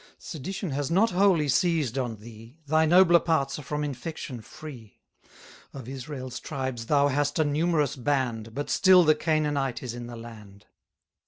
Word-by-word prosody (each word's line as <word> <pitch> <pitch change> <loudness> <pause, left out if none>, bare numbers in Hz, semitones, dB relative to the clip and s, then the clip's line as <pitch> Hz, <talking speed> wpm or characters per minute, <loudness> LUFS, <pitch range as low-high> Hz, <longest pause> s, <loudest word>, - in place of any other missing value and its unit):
Sedition 185 +3 -6
has 140 +1 -2
not 195 +6 +3
wholly 180 -5 +3
seized 150 -3 +1
on 125 -4 -2
thee, 115 +4 -14
Thy 155 +2 +3
nobler 175 0 +6
parts 155 -5 0
are - - -6
from 150 +1 -3
infection 140 -3 -6
free. 120 -4 -12 0.8
Of 130 -4 -8
Israel's 130 -1 -6
tribes 130 -5 -5
thou 145 -1 +3
hast 145 +1 0
a 160 - +3
numerous 150 -1 +1
band, 120 -4 -2
But 145 - -3
still 185 -1 +6
the 155 -1 +5
Canaanite 150 -5 -1
is 125 -2 -5
in 120 0 -7
the 120 - -8
land. 105 -4 -12
140 Hz, 160 wpm, -26 LUFS, 120-155 Hz, 0.8 s, nobler